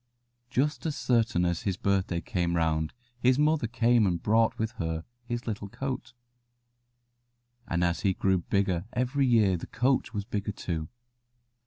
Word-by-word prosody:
Just 145 +5 0
as 150 - -2
certain 115 - +2
as 85 -1 0
his 95 -3 -1
birthday 95 -3 0
came 85 -1 -1
round 80 -1 +1 0.3
his 125 +1 +4
mother 150 -3 +2
came 120 -2 +3
and 85 -2 0
brought 115 +3 +2
with 110 0 -1
her 80 0 -2 0.2
his 120 0 -4
little 105 -3 -4
coat, 130 0 -5 1.5
and 85 +1 0
as 85 -1 +1
he 95 -2 +1
grew 95 -1 +2
bigger 95 -1 0
every 130 +3 +1
year 105 -6 +4
the - - -8
coat 130 -1 +1
was 105 -3 -3
bigger 105 -2 -3
too. 80 -5 -3
105 Hz, 155 wpm, -28 LUFS, 90-120 Hz, 1.5 s, his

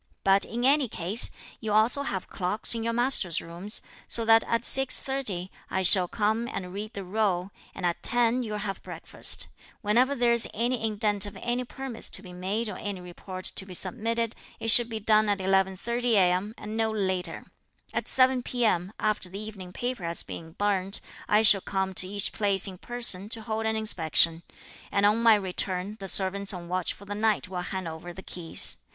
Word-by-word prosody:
But, 195 +1 +3
in 240 +2 -3
any 280 0 +4
case, 205 +2 +3 0.3
you 215 -2 -3
also 220 +6 +3
have 195 -9 -4
clocks 195 +6 +1
in 230 -1 -3
your 230 - -1
master's 230 -8 +2
rooms, 175 +6 -3 0.2
so 230 - +5
that 225 0 +5
at 230 0 -1
6.30, 255 -8 +2 0.2
I 190 - -2
shall 185 0 +7
come 220 +4 -1
and 180 -1 -6
read 210 +3 -6
the 200 - -6
roll, 190 -1 -1 0.2
and - - -5
at 170 -1 -2
ten 240 +1 +2
you'll 215 -3 -4
have 200 -1 -5
breakfast. - - +3 0.4
Whenever 245 +7 +2
there 240 -2 +2
is 235 -1 +3
any 240 +1 -1
indent 210 -2 +2
of 205 -1 -10
any 245 +1 -2
permits 265 -2 -5
to 190 - 0
be 180 -2 -11
made 195 +6 -3
or 205 - -7
any 205 -2 -5
report 185 +1 -9
to - - -1
be 190 -1 -9
submitted, 230 +2 0 0.3
it 225 - -3
should 235 +1 +7
be 220 -1 -5
done 215 0 +2
at 205 - +1
11.30 190 +5 -1
a.m. 190 +2 +1
and 215 +1 -8
no 225 0 0
later. 190 -5 -3 0.5
At - - -3
7 255 -1 +3
p.m., 220 -7 -1
after 210 -4 -2
the 190 - -8
evening 205 -4 -9
paper 245 0 -5
has 170 0 0
been 160 -1 -10
burnt, 195 -1 0 0.3
I 210 +1 +3
shall 205 -3 +6
come 190 0 -3
to 185 - 0
each 200 0 -2
place 200 -3 +2
in 185 -3 -6
person 220 -5 -1
to 225 0 -4
hold 220 0 -3
an 220 - -1
inspection; 165 -6 +3 0.5
and 200 0 +1
on 210 +3 +3
my 230 -2 +6
return, 190 +1 -3
the 195 - -7
servants 195 +1 +1
on 175 -1 -9
watch 180 0 -2
for 200 - -11
the 205 - -6
night 210 -2 0
will 180 -1 -4
hand 185 0 -5
over 160 +2 -8
the 190 - -11
keys. 170 -2 +3
205 Hz, 195 wpm, -26 LUFS, 185-230 Hz, 0.5 s, shall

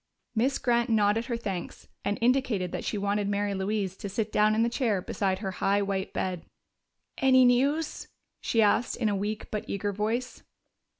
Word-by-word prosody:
Miss 245 +4 +1
Grant 240 -1 +1
nodded 220 +1 +2
her 235 -2 -2
thanks 195 -6 -5 0.2
and 205 - -1
indicated 235 -7 +1
that - - -4
she 210 - -2
wanted 200 0 0
Mary 205 0 0
Louise 195 -1 -2
to 200 - -6
sit 215 +2 -2
down 215 0 +3
in 225 - +3
the - - +2
chair 230 -5 0
beside 190 +1 -1
her 190 -1 -4
high 200 +1 +2
white 195 -1 -2
bed. 185 -2 -3 0.8
"Any 260 -1 +6
news?" 280 +6 +1 0.3
she 225 -1 +2
asked 210 +3 +2
in 225 -3 +1
a 205 - 0
weak 210 +2 -4
but 210 - -2
eager 200 +1 -2
voice. 225 +5 -2
210 Hz, 180 wpm, -28 LUFS, 200-235 Hz, 0.8 s, Any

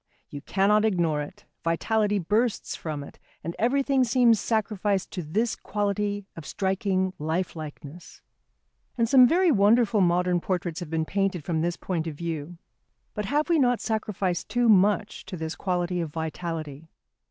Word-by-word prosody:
You 145 - -7
cannot 200 +6 +2
ignore 170 -8 +1
it, 195 +7 -10 0.2
vitality 210 +5 +1
bursts 210 +6 0
from 150 -3 -5
it, - - -13 0.2
and 170 - -4
everything 270 +3 +2
seems 240 -2 +4
sacrificed 205 -3 -1
to 180 - -4
this 215 +9 -1
quality 205 -1 -2
of 165 - -8
striking 190 0 -1
lifelikeness. 160 -1 -5 0.7
And 230 -1 +2
some 255 0 +7
very 350 +4 +3
wonderful 215 -1 +4
modern 180 0 +2
portraits 175 -3 -2
have 175 -4 -7
been 160 0 -1
painted 195 -2 -1
from 160 0 -1
this 170 +1 -1
point 170 -3 -3
of 155 - -5
view. 165 +1 -5 0.6
But 210 - -3
have 295 +8 0
we 335 -2 +3
not 245 -3 +3
sacrificed 205 -5 -2
too 245 0 +2
much 205 +1 +3
to 190 -1 -6
this 160 0 -4
quality 180 -1 -1
of 165 - -3
vitality? 160 -2 -5
190 Hz, 155 wpm, -26 LUFS, 165-215 Hz, 0.7 s, some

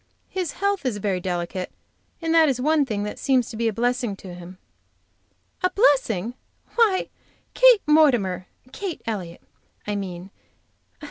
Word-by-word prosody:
His 365 -4 -3
health 400 -2 -1
is 250 -6 -1
very 195 -2 -1
delicate, 180 0 -3 0.5
and 325 0 +1
that 315 -6 +5
one 295 +2 +2
thing 205 -3 -2
seems 255 -3 +1
to - - -8
be 230 +1 0
a - - +2
blessing 240 -1 -1
to 190 -2 -10
him." 180 +1 -11 1.0
"A 365 - +3
blessing! 260 - +2 0.4
Why, 435 -6 +2 0.4
Kate - - +6
Mortimer! 245 - +3 0.2
Kate 375 +2 -5
Elliott, 190 -7 -5 0.4
I 210 - -2
mean. 185 -1 -6
235 Hz, 135 wpm, -24 LUFS, 190-315 Hz, 1.0 s, Kate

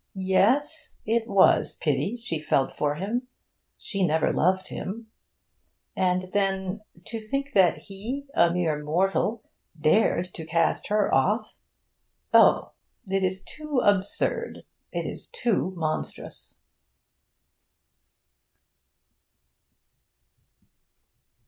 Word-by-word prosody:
Yes, 215 +12 +1
it 225 +1 0
was 200 -4 +4
pity 150 - 0
she 195 -10 -4
felt 135 -3 +1
for 145 -1 0
him. 225 - -3 0.5
She 195 -3 -3
never 160 -2 +2
loved 185 +2 +1
him. 220 +3 -6 0.8
And 185 0 0
then, 195 0 -1 0.2
to 225 - -5
think 275 +6 -4
that 185 -3 +4
he, 230 +9 -6
a 170 - +4
mere 160 -4 -1
mortal, 195 +7 0 0.4
dared 180 +1 +2
to 165 - -7
cast 165 +1 0
her 210 -1 +1
off 200 - +1 0.8
oh, - - +5 0.3
it 195 0 -1
is 185 +1 -1
too 305 -2 -5
absurd, 205 - 0 0.3
it - - -3
is - - -7
too 235 - -1
monstrous! 155 -2 -5
195 Hz, 100 wpm, -26 LUFS, 175-225 Hz, 0.8 s, oh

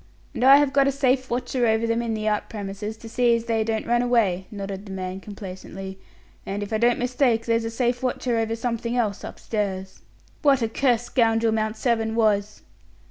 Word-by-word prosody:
"And - - -3
I 270 +2 +9
have 285 -1 +2
got 275 -1 +4
a - - +3
safe 260 -1 +1
watcher 245 0 0
over 220 +1 +2
them 230 +1 0
in 230 -2 -2
the 215 0 -3
out 210 -1 0
premises, 210 +1 -5
to 225 - -11
see 240 +1 +3
as 230 0 -3
they 225 -1 +1
don't 220 0 -2
run 240 +1 +2
away," 210 -7 +1
nodded 200 -1 -6
the - - -8
man, 185 0 -4
complacently; 190 -1 -8 0.4
"and 200 +1 -4
if 205 - -6
I 215 - +1
don't 240 +1 +3
mistake, 245 -2 +1
there's 230 -1 +1
a - - -2
safe 240 +1 -1
watcher 250 -1 -1
over 225 0 -1
something 235 0 -2
else 210 -4 -1
upstairs." 190 -3 -4 0.4
"What 275 -5 +4
a 225 - 0
cursed 245 -1 +1
scoundrel 225 -2 +2
Mount 220 0 -1
Severn 225 -2 0
was." 210 -2 +1
225 Hz, 200 wpm, -24 LUFS, 210-240 Hz, 0.4 s, I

